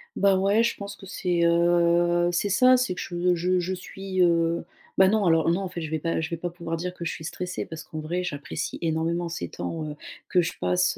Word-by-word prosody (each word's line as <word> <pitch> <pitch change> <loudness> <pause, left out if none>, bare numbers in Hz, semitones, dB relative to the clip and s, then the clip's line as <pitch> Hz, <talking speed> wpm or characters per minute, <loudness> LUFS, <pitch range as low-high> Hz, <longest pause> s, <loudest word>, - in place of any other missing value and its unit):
Bah, 195 -1 +4
ouais 200 +4 +3
je 235 - 0
pense 200 0 -7
que 195 - -13
c'est, 180 -3 -1
heu, 175 0 +3
c'est 175 +4 0
ça. 255 +5 +6
C'est 245 -8 0
que - - -5
je 175 +1 0
je 180 +2 +1
je 185 +2 -2
suis, 185 0 -4
heu 170 -1 +3 0.3
bah, 190 0 +6
non 210 -2 +2
alors, 165 -1 +3
non, 175 +3 +2
en 195 - -3
fait, 175 -2 -6
je 155 -1 -5
vais 160 - 0
pas 165 +1 -1
je 160 - -3
vais 170 - -3
pas 175 +2 -3
pouvoir 170 -1 -5
dire 180 +2 -4
que 175 - -8
je 165 - -1
suis 160 - -7
stressée, 180 +1 -4
parce 160 -1 -8
qu'en 155 0 -7
vrai 175 +4 -2
j'apprécie 145 -5 -4
énormément 165 +1 0
ces 170 - -5
temps, 165 -1 -4
heu, 150 - -6 0.3
que 180 - +4
je 165 - -2
passe, 180 0 +1
175 Hz, 245 wpm, -26 LUFS, 165-185 Hz, 0.3 s, ça